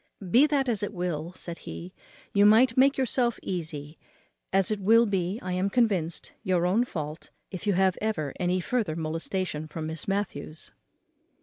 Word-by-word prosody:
Be 270 +8 +6
that 280 -3 +1
as 225 -5 0
it 205 - -3
will," 175 -2 -3
said 170 -2 -6
he, 180 +2 -8 0.4
"you 200 - +5
may 220 +4 +7
make 270 +2 +4
yourself 250 -2 +1
easy, 155 -4 -5 0.5
as 195 +1 +3
it 210 - -1
will 225 +4 +5
be, 190 -1 -1
I 185 -1 -3
am 185 +2 0
convinced, 195 -8 0
your 180 -2 +1
own 210 +7 +2
fault, 155 -6 -6 0.2
if 190 +2 -6
you 205 - +3
have 190 0 +2
ever 165 -10 -1
any 180 +1 +1
further 215 -5 -1
molestation 160 0 -3
from 155 +1 -6
Miss 160 0 -4
Matthews." 195 -6 -4
185 Hz, 170 wpm, -27 LUFS, 165-215 Hz, 0.5 s, may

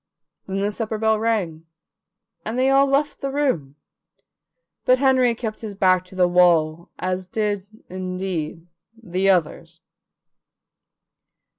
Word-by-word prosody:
Then 195 0 -2
the 205 +1 0
supper 220 0 -3
bell 220 0 +2
rang, 185 -8 -1 0.8
and 220 +3 -4
they 260 +1 +3
all 275 +1 +5
left 280 +2 0
the 275 - -2
room, 255 - -1 1.1
but 255 - +4
Henry 260 -3 +3
kept 220 -2 -5
his 210 -3 -6
back 185 -2 +3
to 185 - -15
the 180 -1 +3
wall, 170 -2 +3
as 185 0 -3
did, 205 -1 -2 0.2
indeed, 185 -3 -4 0.3
the 190 -2 0
others. 165 -2 0
195 Hz, 125 wpm, -22 LUFS, 180-230 Hz, 1.1 s, all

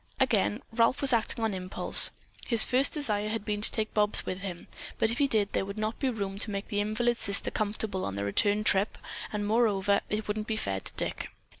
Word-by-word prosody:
Again 100 +2 +1
Ralph 230 +4 +2
was 270 -2 +5
acting 230 0 +1
on 220 -2 0
impulse. 185 0 +4 0.4
His 230 -3 +6
first 260 +2 +4
desire 215 -9 +1
had 220 -1 -4
been 210 -1 -3
to - - +6
take 215 -1 -3
Bobs 210 -1 +2
with 185 - -4
him, 190 -3 -8 0.3
but 220 - +2
if 235 - -3
he 285 - +3
did 210 -5 0
there - - 0
would 200 +2 -8
not 215 +1 -3
be 270 - 0
room 200 -4 -5
to 215 - +1
make 200 0 -5
the 205 - -2
invalid 230 +3 -1
sister 200 0 +1
comfortable 210 -2 -3
on 100 - -4
the 100 0 -3
return 205 - +1
trip, 200 0 +1 0.3
and, 210 -1 -3
moreover, 205 -3 +1
it 210 0 -3
wouldn't 210 0 -3
be 220 - -2
fair 95 - -2
to - - -4
Dick. - - -4
210 Hz, 220 wpm, -28 LUFS, 200-225 Hz, 0.4 s, His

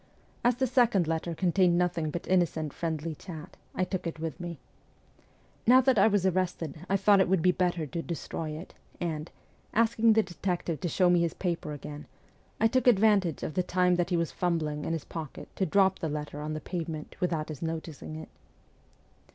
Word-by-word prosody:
As 240 0 +4
the 260 +2 +1
second 235 -8 +3
letter 165 +1 -2
contained 180 0 +3
nothing 175 -3 0
but 170 +3 -5
innocent 160 -5 +1
friendly 160 -1 -3
chat, 170 +2 -9 0.2
I 185 - +1
took 185 -1 -3
it 160 -1 -5
with 160 0 -4
me. 175 -1 -4
v 155 - -15 1.1
Now 255 +2 +8
that 260 -4 +3
I 195 - +7
was 205 -3 +2
arrested 180 -3 -1
I 195 - +3
thought 200 +1 +5
it 185 - +2
would 185 -4 +2
be 185 - +6
better 175 -3 0
to 160 +4 -4
destroy 165 -1 -4
it, 155 +4 -7 0.3
and, 160 -2 -3 0.5
asking 230 0 +4
the 220 0 +4
detective 175 -3 -3
to 180 - -2
show 180 +3 +3
me 175 - +4
his 170 -1 0
paper 170 -4 -2
again, 145 0 -8 0.5
I 225 - +3
took 255 +3 +1
advantage 205 - +4
of - - -3
the 185 - +1
time 180 0 +2
that 175 0 0
he 175 - +1
was 170 -1 -1
fumbling 155 -4 -1
in - - -1
his 165 - -3
pocket 160 -4 -7
to 190 - +1
drop 190 -2 +3
the 160 - -2
letter 150 0 -4
on 155 +1 -3
the 155 - -4
pavement 165 -4 -5
without 165 -4 -1
his 150 -4 -7
noticing 160 -2 -5
it. 160 - -8
175 Hz, 200 wpm, -29 LUFS, 160-190 Hz, 1.1 s, Now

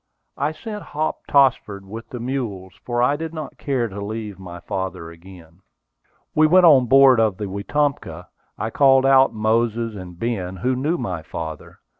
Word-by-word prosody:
I 145 - 0
sent 210 +6 -7
Hop 155 -3 -4
Tossford 115 -8 +2
with 110 +4 -9
the 125 - -7
mules, 115 -7 -4
for 120 0 -1
I 140 +4 +3
did 160 +2 -6
not 155 -2 -7
care 130 -5 -1
to 100 -1 -7
leave 105 -2 -6
my 90 -2 -9
father 90 -2 -5
again. 85 0 -15 0.7
We 155 0 +4
went 180 +3 +5
on 135 -7 +6
board 135 -1 +6
of 110 -4 +1
the 105 - -4
Wetumpka. 135 +9 -2 0.3
I 110 - -3
called 135 0 +4
out 135 0 +5
Moses, 115 +1 0
and 90 -4 -10
Ben, 95 -5 -3
who 125 +7 -1
knew 150 +7 -1
my 90 -9 -4
father. 80 0 -8
115 Hz, 170 wpm, -21 LUFS, 95-135 Hz, 0.7 s, on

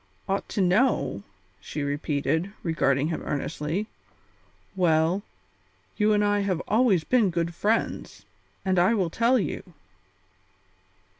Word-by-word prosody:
"Ought 195 +1 -2
to 200 - -1
know?" 190 - +2 0.4
she 150 - -5
repeated, 145 +4 -1
regarding 150 -3 +1
him 160 - -3
earnestly. 155 +6 -3 0.9
"Well, 170 +1 +2 0.7
you 215 0 +2
and 210 0 +3
I 205 0 +2
have 200 -3 0
been - - -6
always 215 -6 +3
good 170 -7 +1
friends, 215 +7 -2 0.4
and 185 -1 +2
I 185 +6 +4
will 185 -6 0
tell 235 +6 +3
you." 215 - -2
180 Hz, 120 wpm, -26 LUFS, 160-205 Hz, 0.9 s, I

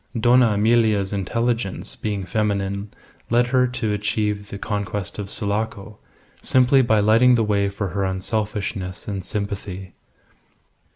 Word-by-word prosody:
Dona 120 -1 +5
Emilia's 105 -2 +2
intelligence 115 +1 -2
being 100 -3 -3
feminine 100 0 -1 0.4
led 120 +1 +3
her 125 -1 +4
to 115 -4 -2
achieve 105 0 -1
the 100 - -6
conquest 105 -1 -4
of 100 -2 -5
Sulaco, 105 0 -3 0.4
simply 130 +1 +4
by 110 -4 +3
lighting 115 +4 +5
the 115 - +2
way 100 -2 +1
for 100 0 -4
her 100 +3 -2
unselfishness 100 0 -3
and 100 -3 -4
sympathy. 100 -1 -5
105 Hz, 125 wpm, -22 LUFS, 100-115 Hz, 0.4 s, Dona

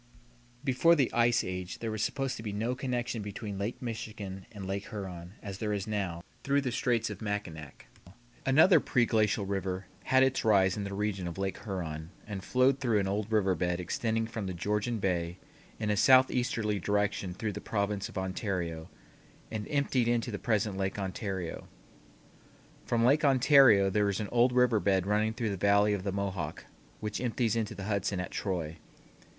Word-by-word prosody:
Before 145 +5 +4
the 140 -6 +1
ice 120 0 +3
age 90 -1 -5
there 115 -1 -4
was 110 -1 -3
supposed 135 +2 -1
to - - -7
be 110 -2 -4
no 110 +5 -1
connection 125 -3 -2
between 100 0 -6
Lake 105 +4 -3
Michigan 105 -5 -6
and 100 -4 -8
Lake 100 +1 -4
Huron, 90 -4 -7
as 100 -2 -6
there 105 -1 -1
is 100 -1 -2
now, 95 -6 -3 0.2
through 140 +1 +2
the 130 -3 -2
Straits 115 -1 0
of - - -8
Mackinac. 100 -9 -5 0.6
Another 155 +8 +6
preglacial 110 -4 +2
river 95 -1 -2 0.2
had 130 0 +5
its 135 0 +1
rise 95 -4 +4
in 105 - -3
the 100 - -5
region 100 -3 -2
of 85 - -6
Lake 95 0 -3
Huron 80 -6 -4 0.2
and 100 -3 -6
flowed 130 +4 +3
through 120 -5 +1
an 95 - 0
old 105 +2 -2
river 100 -4 +3
bed 90 0 -1
extending 115 +5 -1
from 110 -3 -5
the 95 - -4
Georgian 105 +6 -1
Bay 90 -3 -1 0.4
in 105 -1 -1
a - - +2
southeasterly 120 -3 +3
direction 100 -1 -1
through 105 +1 -3
the 105 - -6
province 100 -1 -2
of - - -9
Ontario, 95 -4 -3 0.6
and 105 -2 -4
emptied 135 -4 +1
into 120 0 0
the 100 - -4
present 105 -3 0
Lake 95 0 -2
Ontario. 95 -3 -4 1.2
From 115 -1 +2
Lake 145 +5 +4
Ontario 130 -7 +6
there 105 +1 +2
is 100 - -1
an 105 - -3
old 120 +1 +4
river 125 -3 +3
bed 95 -2 +2
running 105 +2 +1
through 115 -4 -1
the 100 - -3
Valley 100 +2 +4
of 100 - -2
the 100 - -1
Mohawk 95 -5 -3 0.4
which 105 +1 -3
empties 120 -2 0
into 110 -2 -2
the 95 - -6
Hudson 100 -2 -1
at 90 - -4
Troy. 85 -5 -3
105 Hz, 180 wpm, -30 LUFS, 95-115 Hz, 1.2 s, Another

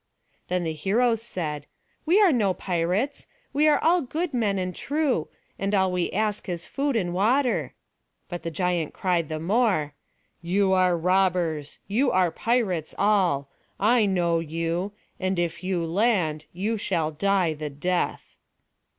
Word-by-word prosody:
Then 180 -1 0
the 160 -1 -2
heroes 225 +7 0
cried: 150 -4 -4 0.4
"We 360 +6 +5
are 400 -5 +6
no 205 -8 +2
pirates. 185 +11 -1 0.3
We 295 +3 +3
are 300 - +5
all 345 +2 +3
good 310 +4 -3
men 215 -5 +1
and 185 -1 -3
true; 285 - 0 0.3
and 200 +1 0
all 190 -1 +2
we 180 -1 -1
ask 210 -1 -1
is 175 -1 -3
food 280 -1 -1
and 180 -6 0
water"; 240 +7 +1 0.5
but 175 -2 -6
the 165 - -4
giant 175 -1 -1
cried 175 -4 0
the 155 0 -3
more 185 -5 +1 0.5
"You 190 +3 +2
are 185 -2 +3
robbers, 175 -4 +1
you 250 +7 +2
are 185 -2 +3
pirates 200 -10 -1
all; 180 -9 +2 0.3
I 220 +1 +4
know 175 -3 +1
you; 165 +4 -2 0.3
and 185 0 -1
if 175 +1 -2
you 185 -2 -1
land, 165 -5 +1
you 210 +6 -2
shall 165 -6 -1
die 185 +1 +1
the 150 0 -5
death." 175 +6 -2
185 Hz, 150 wpm, -25 LUFS, 170-220 Hz, 0.5 s, are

